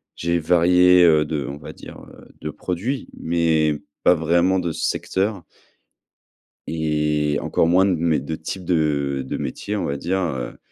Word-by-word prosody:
J'ai 85 +1 0
varié, 90 +2 +5
heu, 80 -3 +5
de, 75 0 -3
heu, - - -6
on 70 - -6
va - - -9
dire, - - -12 0.2
heu, - - -16
de 75 - -4
produits, 100 - -4
mais 80 -3 +1 0.2
pas 90 - +5
vraiment 85 +4 +2
de 85 -2 -2
secteur 95 -2 -2 1.2
et 75 -2 0
encore 80 - +1
moins 90 +3 +4
de 95 -3 +2
mé 80 -2 +1
de 80 +4 -5
type 90 +4 -6
de 70 -5 0
de - - -3
métier, 105 +1 -4
on 100 - -2
va 70 0 -2
dire, 95 +6 -1
heu, 65 -8 -4
80 Hz, 170 wpm, -22 LUFS, 75-90 Hz, 1.2 s, varié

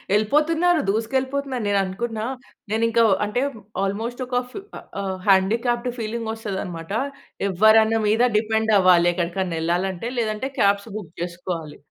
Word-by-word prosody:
ఎళ్ళిపోతున్నారు, 315 +10 +3
దూసుకెళ్ళిపోతున్నారు. 260 +3 -1
నేను 200 -1 +2
అనుకున్నా, 220 +3 -3 0.5
నేను 225 +1 +1
ఇంకా 230 0 +3 0.2
అంటే 210 +5 -1 0.4
ఆల్మోస్ట్ 225 +6 -3
ఒక 245 0 0
ఫిఫ్ 400 +5 -9
ఆహ్, - - -12 0.2
ఆహ్, 190 -1 -3
హ్యాండీక్యాప్డ్ 235 +6 +2
ఫీలింగ్ 225 0 -3
వస్తదనమాట. 190 -6 -5 0.6
ఎవ్వరన్న 220 +4 +5
మీద 220 +3 +2 0.2
డిపెండ్ 220 0 +1
అవ్వాలి, 180 -2 +5
ఎక్కడికైనా 175 0 -2
ఎళ్ళాలి 175 +3 +1
అంటే. 230 +7 -5
లేదంటే 220 +4 -2
క్యాబ్స్ 200 +2 +2
బుక్ 175 -6 -7
జేసుకోవాలి. 170 -3 -5
215 Hz, 130 wpm, -23 LUFS, 190-235 Hz, 0.6 s, ఎవ్వరన్న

